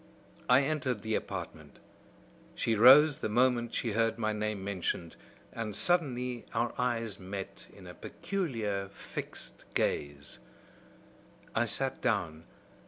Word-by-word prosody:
"I 125 +3 +6
entered 135 -7 -1
the 110 0 -2
apartment. - - -5 0.8
She 115 - 0
rose 135 +7 +8
the - - -2
moment 120 +1 +2
she 115 - -1
heard 115 +1 +1
my 110 -2 0
name 105 -2 -2
mentioned; 90 -3 -3 0.4
and 110 -3 -4
suddenly 125 -8 0
our 115 +1 0
eyes 115 -5 -1
met 95 +1 -6
in 95 - -14
a 90 - -9
peculiar 110 - -3
fixed - - -8
gaze. 70 -1 -1 1.1
"I 110 - +2
sat 135 +4 0
down. 85 -9 -1
115 Hz, 120 wpm, -31 LUFS, 100-125 Hz, 1.1 s, rose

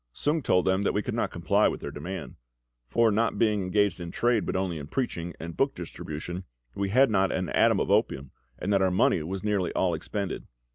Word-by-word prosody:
Sung 155 +2 0
told 90 -8 +2
them 95 +1 +2
that 100 - 0
we 105 - +1
could - - -3
not - - 0
comply - - +2
with - - -2
their - - -6
demand; 90 +6 -6 0.5
for, 115 - +3
not 115 +3 +1
being 105 -3 +2
engaged 95 0 +1
in 85 -1 -5
trade, 115 +2 +1
but - - -2
only 95 -4 -1
in 75 - -7
preaching 85 - -3
and 85 0 -6
book 135 +1 +1
distribution, 85 +1 -6 0.3
we 100 +5 -2
had 130 +4 +4
not 95 -2 +2
an 90 -2 -2
atom - - +3
of - - 0
opium, 65 -1 +1 0.3
and 100 +3 -1
that 100 - +3
our 95 - +4
money 90 -2 +3
was 95 +4 -4
nearly 100 -4 0
all 90 -2 +1
expended. 100 +4 -4
95 Hz, 220 wpm, -27 LUFS, 85-105 Hz, 0.5 s, had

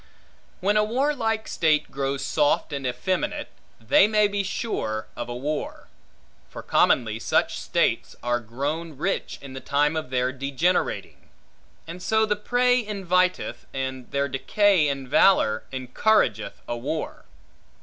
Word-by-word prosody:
When 205 +3 +2
a 210 - +4
warlike 225 -2 0
state 155 -2 +1
grows 135 0 -2
soft 145 0 +1
and 135 -2 -2
effeminate, 185 +8 -2 0.3
they 120 - +5
may 210 -1 +3
be 205 0 -1
sure 190 - -3
of 120 0 -5
a 120 - -4
war. 145 +4 -4 0.6
For - - -9
commonly 115 -3 +2
such - - +1
states - - 0
are 120 0 +1
grown 140 +7 -4
rich 195 +7 -2
in 135 -1 -9
the 130 - -6
time 145 +3 +1
of 155 -5 -3
their 125 0 0
degenerating; 140 +7 -1 0.6
and 170 +2 -8
so 220 +3 +2
the 210 -1 0
prey 245 +3 +2
inviteth, 185 -3 0
and 130 -1 -4
their 140 0 0
decay 180 +5 +2
in 135 -2 -3
valor, 135 - +4
encourageth 130 - +1
a 120 - -2
war. 145 +7 -4
150 Hz, 140 wpm, -25 LUFS, 130-205 Hz, 0.6 s, they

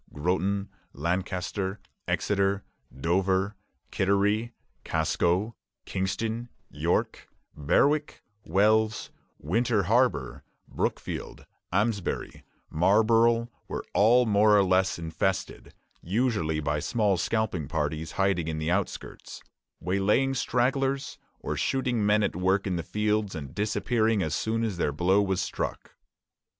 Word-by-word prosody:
Groton, 95 +6 -1 0.2
Lancaster, 95 +4 -2 0.3
Exeter, 100 0 0 0.3
Dover, 95 +7 0 0.4
Kittery, 100 +4 +1 0.3
Casco, 90 +7 0 0.3
Kingston, 110 +5 -2 0.2
York, - - -1 0.3
Berwick, 145 - +1 0.2
Wells, 110 +4 +2 0.3
Winter 110 - +1
Harbor, 105 - +1 0.2
Brookfield, - - -4 0.3
Amesbury, 100 0 -1 0.3
Marlborough, 115 +6 +3 0.2
were - - -5
all 120 +5 +5
more 105 -1 +5
or 100 - +5
less 95 0 +2
infested, 85 +3 -3 0.3
usually 95 -6 0
by 75 0 -1
small 105 - +1
scalping 95 -4 -1
parties, 80 +3 -2
hiding 95 -4 +1
in 80 -1 -2
the 80 +2 -1
outskirts, 100 +1 -4 0.4
waylaying 100 +9 +1
stragglers, 135 +2 0 0.2
or - - -3
shooting 125 -4 0
men 105 +1 +3
at - - -1
work 95 +2 +1
in 95 -3 -1
the 85 - -1
fields, 105 +2 -1
and 70 -4 -7
disappearing 110 0 +1
as 80 - -2
soon 115 +1 -1
as 105 -5 -2
their 80 - 0
blow 90 +7 +2
was 95 -2 0
struck. - - -4
100 Hz, 110 wpm, -27 LUFS, 90-110 Hz, 0.4 s, all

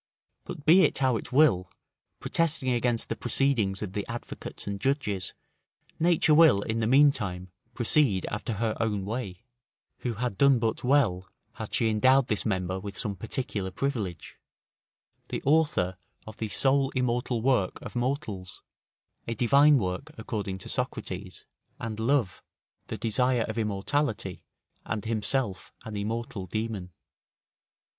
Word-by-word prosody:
But 145 - -8
be 175 +5 +7
it 155 - +3
how 130 -3 +2
it - - -5
will, 125 - +4 0.5
protesting 160 -5 +1
against 120 -1 0
the - - -2
proceedings 120 -7 +1
of 95 -3 -6
the 100 - -2
advocates 120 +1 -7
and 100 -1 -4
judges, 105 -9 -1 0.6
nature 165 -2 +4
will, 150 -10 +6
in 110 +1 -2
the 110 - +1
meantime, 110 -10 +3 0.2
proceed 120 -5 +2
after 105 +3 -3
her 110 +1 -1
own 105 -4 -1
way, 100 -4 -5 0.6
who 120 -3 -3
had 115 -3 -3
done 140 -2 +6
but 115 -1 -1
well, 115 -9 +2 0.2
had - - -5
she 115 - +2
endowed 130 +4 +4
this 105 - 0
member 95 -2 -1
with 100 0 -7
some 100 -2 -2
particular 105 -1 -3
privilege; 100 - -4 0.9
the - - -4
author 140 - +2 0.3
of 110 - -10
the 110 - -3
sole 135 +3 +2
immortal 125 -1 0
work 125 -8 +1
of - - -8
mortals; 120 -7 -3 0.6
a 115 - -2
divine 140 +6 +5
work, 105 +7 -3
according 105 -3 -4
to 95 - -11
Socrates; - - -4 0.3
and 110 -1 -5
love, 115 -4 +1 0.5
the - - -4
desire 120 +2 +1
of 110 - -4
immortality, 105 - -1 0.4
and 110 0 -4
himself 110 -2 -1
an 110 - -6
immortal 110 -1 -3
demon. 105 -1 -3
115 Hz, 140 wpm, -28 LUFS, 100-135 Hz, 0.9 s, be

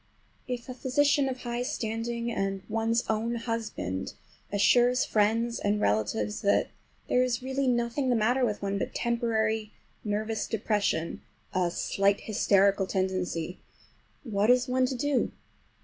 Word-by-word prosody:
If 245 -1 -4
a 255 - -5
physician 275 +2 +2
of 255 -1 -5
high 240 0 -2
standing, 235 0 -2
and 195 -3 -2
one's 225 +1 +1
own 225 +2 0
husband, 225 - -3 0.4
assures 245 +5 +4
friends 225 +3 +1
and 205 +1 +1
relatives 105 - 0
that 200 - +2 0.4
there 250 - +3
is 250 -1 0
really 265 +1 -1
nothing 240 +2 +1
the 245 - +3
matter 245 +4 +2
with 210 -4 -1
one 200 0 -1
but - - -4
temporary 220 -2 0 0.3
nervous 215 +1 -2
depression—a 190 -4 -2
slight 195 +3 +1
hysterical 200 -2 +3
tendency—what 190 - -3
is 250 +1 +4
one 255 0 +2
to 260 - -3
do? 280 +1 0
225 Hz, 130 wpm, -28 LUFS, 200-245 Hz, 0.4 s, assures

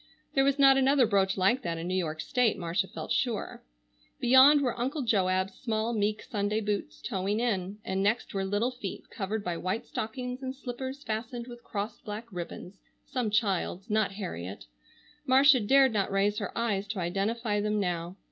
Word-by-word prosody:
There 270 - +4
was 275 0 +2
not 270 -1 +7
another 270 -1 +4
brooch 195 -3 +2
like 195 +8 +3
that 170 -7 -3
in 165 +1 -4
New 185 - -2
York 160 -4 -1
state, 250 -4 +1
Marcia 175 +2 -1
felt - - -7
sure. 240 -6 -1 0.6
Beyond 260 +4 +7
were 250 -4 0
Uncle 270 +4 -1
Joab's 190 -4 +1
small 225 +1 -2
meek 210 0 0
Sunday 210 0 -1
boots, 205 -8 -3
toeing 200 -1 -1
in, 200 -4 -1
and 190 0 -1
next 210 +4 0
were 195 -1 -1
little 205 +6 0
feet 230 -6 -7
covered 205 +1 -3
by 175 -3 -2
white 185 +6 -2
stockings 250 +3 -4
and 260 0 -4
slippers 260 +2 -6
fastened 230 +2 -4
with 240 -1 -11
crossed 205 +1 -5
black 210 +2 -6
ribbons, 180 +2 -7 0.3
some 250 -4 -2
child's, 200 -2 -1
not 215 -2 +1
Harriet—Marcia 230 - 0
dared 265 +3 +4
not 200 -2 0
raise 200 +2 +1
her 200 - -4
eyes 205 -4 0
to 205 -1 -4
identify 205 +4 -1
them 210 0 0
now. 175 -2 -2
210 Hz, 175 wpm, -29 LUFS, 195-245 Hz, 0.6 s, not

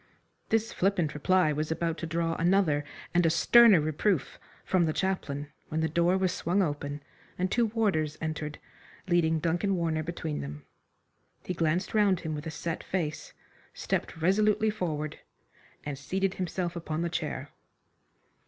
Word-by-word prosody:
This 225 0 +1
flippant 180 -5 +1
reply 175 +1 +2
was 155 +2 -2
about 165 0 -1
to 165 - -4
draw 165 0 0
another 170 -4 +3 0.3
and 175 0 +4
a 165 - +4
sterner 220 +4 +7
reproof 155 +2 0 0.3
from 185 -3 +3
the 155 - 0
chaplain, 150 -7 -2 0.2
when 160 +1 -1
the 160 - +2
door 170 +4 +2
was 190 -1 +1
swung 185 +5 +1
open 145 -2 -3 0.3
and 185 +1 -1
two 240 -2 +3
warders 195 -9 0
entered 155 -1 -4 0.5
leading 165 -2 +3
Duncan 175 +5 0
Warner 165 -3 0
between 150 - -4
them. 75 +1 -7 0.8
He 180 - -2
glanced 165 +2 0
round 205 -4 +3
him 160 -1 -3
with 150 +2 -5
a - - -2
set 160 +1 -4
face, 165 -5 -3 0.4
stepped - - -2
resolutely 210 +5 +3
forward, 155 -7 -3 0.7
and 145 -1 -3
seated 190 +6 -1
himself 180 -1 -3
upon 165 -1 -3
the - - 0
chair. - - -4
170 Hz, 155 wpm, -29 LUFS, 155-185 Hz, 0.8 s, sterner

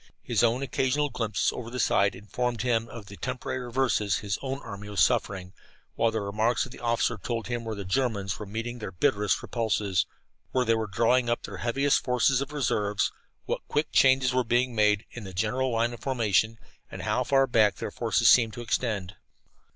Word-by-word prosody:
His 115 -4 +1
own 120 +3 +2
occasional 140 +2 0
glimpses 105 -4 0
over 115 -2 -6
the 125 +1 -5
side 100 -3 +2
informed 115 +5 -3
him 115 -2 +1
of 115 -3 -9
the 100 0 -11
temporary 125 0 -4
reverses 120 -5 0
his 100 -1 -3
own 135 0 -3
army 105 -1 -8
was 105 - -3
suffering, 95 -6 +1 0.4
while 115 - +2
the 110 -1 -2
remarks 110 +4 0
of 130 - -12
the - - -11
officer 115 -2 0
told 115 -2 -3
him 120 -1 -3
where 110 -1 -4
the 100 -1 -6
Germans 100 -3 -1
were 105 - -6
meeting 115 +4 -5
their 105 - -5
bitterest 100 +4 +1
repulses, 105 -5 0 0.5
where 130 -1 +2
they 115 - +3
were 110 -1 -1
drawing 120 +5 +2
up 120 - 0
their - - -7
heaviest 135 +4 +1
forces 125 +1 +2
of 140 +1 -4
reserves, 105 -8 0 0.3
what - - -2
quick 150 +1 -1
changes 130 -1 +4
were 130 0 +2
being 120 +2 +1
made 105 -1 +2
in 120 - -8
their 95 -1 -8
general 125 +8 0
line 115 0 0
of 120 - -9
formation, 115 -4 +1 0.3
and - - -7
how - - +1
far 135 -1 +3
back 110 -5 +3
their - - -5
forces - - +1
seemed 115 -3 +6
to 120 - -7
extend. 110 -5 -2
115 Hz, 195 wpm, -27 LUFS, 105-125 Hz, 0.5 s, seemed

